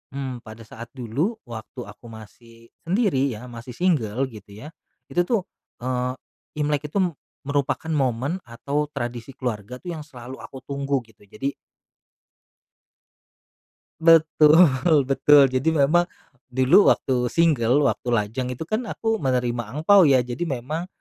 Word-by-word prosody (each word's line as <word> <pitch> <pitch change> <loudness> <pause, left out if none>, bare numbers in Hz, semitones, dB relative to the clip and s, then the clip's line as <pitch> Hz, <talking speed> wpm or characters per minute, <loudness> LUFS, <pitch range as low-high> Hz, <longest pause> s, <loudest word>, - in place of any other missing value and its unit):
mmm, 130 -3 -4
pada 110 +1 -11
saat 115 +2 -10
dulu 135 - -2
waktu 120 +2 -8
aku 105 +2 -14
masih 115 +1 -14 0.2
sendiri 170 - +1
ya, 125 +4 -10
masih 120 +1 -9
single 135 - 0
gitu 105 -2 -13
ya, 150 - -8 0.4
itu 175 0 +1
tuh, 230 -5 +1 0.4
eee, 125 0 -1 0.4
Imlek 150 0 -1
itu 150 - -4
m 175 -2 -1 0.3
merupakan 140 +2 -1
momen 135 +3 0
atau 140 +6 -2
tradisi 120 -1 -5
keluarga 120 -2 -4
tuh 175 - -7
yang 155 - -7
selalu 130 -1 -10
aku 135 - -9
tunggu 140 0 -1
gitu. 110 -2 -23
Jadi 135 +7 -3 2.5
Betul 160 -2 +5
betul. 135 +1 +5
Jadi 135 +5 +1
memang 160 +5 +3 0.4
dulu 130 +9 +4
waktu 125 -2 +2
single, 145 -3 +2
waktu 125 -2 -1
lajang 115 +4 -2
itu 145 - -5
kan 215 +8 -3
aku 225 +1 -1
menerima 125 -4 0 0.2
angpao 175 +3 +5
ya. 130 -3 +4
Jadi 125 +8 -4
memang, 150 +5 -4
135 Hz, 135 wpm, -23 LUFS, 120-155 Hz, 2.5 s, Betul